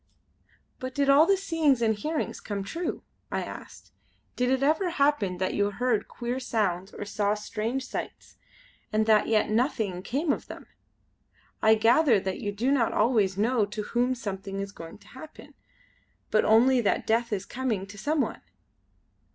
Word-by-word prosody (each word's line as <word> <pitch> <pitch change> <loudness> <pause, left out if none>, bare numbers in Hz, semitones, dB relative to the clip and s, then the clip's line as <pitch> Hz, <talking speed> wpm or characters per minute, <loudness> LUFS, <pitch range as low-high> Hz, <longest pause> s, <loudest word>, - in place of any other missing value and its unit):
"But 255 0 -6
did 280 -1 +1
all 295 +4 +6
the 395 - +4
seeings 325 -8 +1
and 225 -2 +2
hearings 300 +9 -3
come 200 -2 -4
true?" 330 - -4 0.3
I - - -1
asked. - - -10 0.4
"Did 250 0 +1
it 265 +1 +1
ever 320 +6 +2
happen 280 - +1
that 185 +1 -1
you 205 0 +1
heard 220 0 0
queer 245 +1 -4
sounds 195 -7 -1
or - - -7
saw 205 0 0
strange 225 +5 -3
sights - - -7 0.5
and 215 0 +2
that 215 -1 +4
yet 215 -1 +2
nothing 220 -6 0
came 285 - 0
of - - -7
them? - - -10 1.0
I 220 0 +6
gather 235 +2 +4
that 190 0 -4
you 205 - -3
do 230 +7 0
not 250 -5 +2
always 210 -4 +2
know 225 +2 +2
to 210 +1 -5
whom 245 +4 0
something 195 -3 -5
is 195 0 -4
going 165 -4 -10
to - - -21
happen; 300 +4 -12 0.8
but 215 - +3
only 245 +4 +5
that 205 - 0
death 230 +1 +1
is 200 -2 -2
coming 240 -7 -2
to 200 +1 -12
some 290 +9 0
one!" - - -3
225 Hz, 170 wpm, -27 LUFS, 205-265 Hz, 1.0 s, all